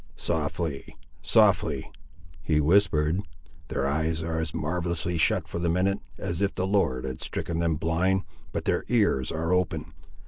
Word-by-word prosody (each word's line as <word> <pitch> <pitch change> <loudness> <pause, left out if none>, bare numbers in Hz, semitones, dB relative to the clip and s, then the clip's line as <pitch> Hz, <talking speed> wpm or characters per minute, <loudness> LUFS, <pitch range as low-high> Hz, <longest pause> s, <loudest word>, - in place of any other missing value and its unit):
"Softly, 80 -2 -2 0.2
softly," - - +3 0.5
he 75 -2 +1
whispered, 80 0 +3 0.5
"their 80 -5 -1
eyes 80 +3 0
are 80 -1 -2
as 80 0 -2
marvellously 85 +1 -2
shut - - +2
for - - -4
the 85 0 0
minute, 95 +4 +1 0.2
as 85 +2 -3
if 100 0 +1
the 95 - 0
Lord 80 -11 +1
had 65 -1 -5
stricken 85 -1 -3
them 85 -1 +1
blind; 90 +5 +1 0.3
but - - -3
their - - +1
ears 100 - +2
are 80 +2 -1
open. 90 -2 -1
85 Hz, 150 wpm, -27 LUFS, 80-90 Hz, 0.5 s, softly